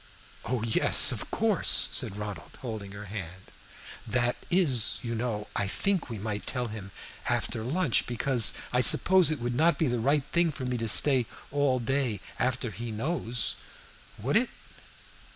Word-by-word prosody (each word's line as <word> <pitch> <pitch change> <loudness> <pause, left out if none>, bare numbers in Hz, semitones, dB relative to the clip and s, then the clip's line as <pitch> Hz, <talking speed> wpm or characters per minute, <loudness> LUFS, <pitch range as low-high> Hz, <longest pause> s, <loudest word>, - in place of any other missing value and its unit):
"Oh 120 0 -3
yes, 115 -1 +5
of - - -6
course," - - +4
said 100 - 0
Ronald, 105 -6 -8
holding 110 -5 -7
her 100 +1 -10
hand. 95 -3 -9 0.6
"That 120 -1 0
is, 145 - +2
you 115 -1 -4
know, 110 -2 -4
I 100 - 0
think 190 - -2
we 115 - -6
might 105 0 -6
tell 125 -2 -3
him 105 -3 -9 0.4
after 110 - -2
lunch. 145 +2 0
Because 125 0 +4 0.2
I 125 - +2
suppose 185 +6 +6
it 155 -3 -2
would 120 +1 -4
not 160 +4 +2
be 160 - 0
the 120 -3 -2
right 140 +4 0
thing 170 -1 +1
for 135 -3 -7
me 125 -1 -3
to 115 - -3
stay 125 +2 +3 0.2
all 140 -2 0
day 125 -3 -2 0.2
after 125 -2 -2
he 115 +3 -8
knows. 115 -2 -1 0.6
Would 130 - 0
it?" 245 +2 0
120 Hz, 165 wpm, -27 LUFS, 110-140 Hz, 0.6 s, suppose